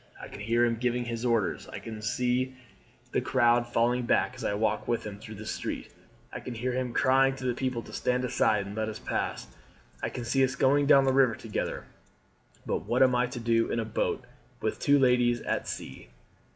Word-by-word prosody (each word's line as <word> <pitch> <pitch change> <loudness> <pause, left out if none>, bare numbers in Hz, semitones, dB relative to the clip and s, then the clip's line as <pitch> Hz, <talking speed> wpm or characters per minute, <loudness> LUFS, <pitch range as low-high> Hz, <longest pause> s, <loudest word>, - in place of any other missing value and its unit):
I - - -9
can - - -10
hear 115 +3 +2
him 115 -1 0
giving 120 +1 0
his 115 0 -4
orders, 115 -5 0
I - - -7
can 110 -1 -7
see 125 +4 0 0.6
the - - +1
crowd 120 0 +3
falling 120 +1 +1
back - - +2
as - - -9
I 100 - 0
walk 110 +2 0
with 120 - 0
him 100 -1 -7
through 110 +1 -9
the 110 +2 -9
street, - - -5 0.4
I - - -4
can 125 - -7
hear 125 +3 -2
him 125 0 -2
crying 135 +2 +3
to 130 - -7
the 125 - +1
people 125 -2 -2
to - - -12
stand 125 0 0
aside 105 -4 +2
and 100 +1 -7
let 110 0 -1
us 110 - -6
pass, - - -3 0.6
I - - -1
can 125 - -6
see 135 +3 +2
us 130 0 +1
going 140 +1 +3
down 140 -2 +7
the 135 - +3
river 130 -4 +4
together; 110 -2 -4 0.8
but - - -1
what 125 +3 +4
am 130 -1 +4
I 125 0 +2
to 125 0 -6
do 115 0 +2
in 115 - -1
a 115 - -1
boat 110 - -1 0.4
with - - -2
two 145 0 +4
ladies 125 -2 +3
at - - -2
sea?" - - -7
120 Hz, 215 wpm, -28 LUFS, 115-130 Hz, 0.8 s, down